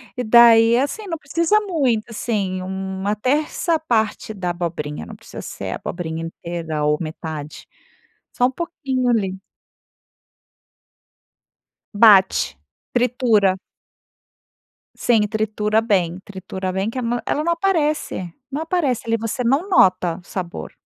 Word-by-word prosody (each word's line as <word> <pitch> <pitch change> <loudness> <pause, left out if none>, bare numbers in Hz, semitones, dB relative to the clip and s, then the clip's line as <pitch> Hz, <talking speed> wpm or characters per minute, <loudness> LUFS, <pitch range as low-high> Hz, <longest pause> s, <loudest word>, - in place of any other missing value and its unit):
e 250 - -2
daí, 230 0 +7
é 250 - +3
assim, 410 +9 -5
não 330 -3 -3
precisa 335 +8 +1
muito, 275 - 0
assim, 205 -5 -2
uma 190 +2 -3
terça 300 - 0
parte 220 -6 -1
da 180 -4 -2
abobrinha. 165 -4 -4
Não - - -10
precisa - - -10
ser - - -6
a - - -2
abobrinha 165 -2 -5
inteira 165 -2 -4
ou 150 0 +2
metade. 155 -2 -6 0.7
Só 245 - +2
um - - -4
pouquinho 265 -5 -2
ali. 195 -5 0 2.6
Bate, 200 - +5 0.4
tritura. 235 -6 +2 1.4
Sim 220 -4 +2
tritura 215 0 0
bem 185 -6 0
tritura 190 -1 -5
bem 190 +3 -1
que 230 - -7
a - - -2
ma 240 0 -1
ela 300 - 0
não 340 - +1
aparece, 305 - -1 0.2
não 290 +4 -2
aparece 320 -9 0
ali, 230 0 +1
você 225 +3 -3
não 275 +11 +1
nota 185 - +3
o - - -22
sabor. 180 -2 -5
220 Hz, 130 wpm, -21 LUFS, 185-260 Hz, 2.6 s, daí